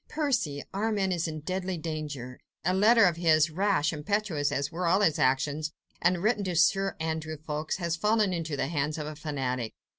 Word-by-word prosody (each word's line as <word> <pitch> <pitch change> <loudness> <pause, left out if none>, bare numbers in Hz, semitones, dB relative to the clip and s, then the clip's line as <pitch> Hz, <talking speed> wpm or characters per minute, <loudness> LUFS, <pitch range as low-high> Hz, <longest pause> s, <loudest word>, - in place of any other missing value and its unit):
"Percy!—Armand 205 - -1
is 170 -1 -1
in 155 -1 -5
deadly 185 +2 -3
danger. 150 -6 -5 0.3
A 185 - +2
letter 220 +3 +6
of 175 -3 +2
his... 160 -2 +3
rash, 180 -3 +1
impetuous, 155 -2 -1
as 140 +2 -1
were 175 +1 -2
all 190 +4 +3
his 160 -7 +2
actions, 145 +4 +1 0.3
and 175 +1 +2
written 215 -1 +2
to 180 -2 -2
Sir 195 +4 +3
Andrew 160 -1 -3
Ffoulkes, 155 0 -3
has 170 -3 -1
fallen 210 0 +2
into 165 -4 -3
the - - 0
hands 150 0 -1
of 155 - -4
a 155 0 -6
fanatic. 130 -6 -3
165 Hz, 180 wpm, -28 LUFS, 150-190 Hz, 0.3 s, letter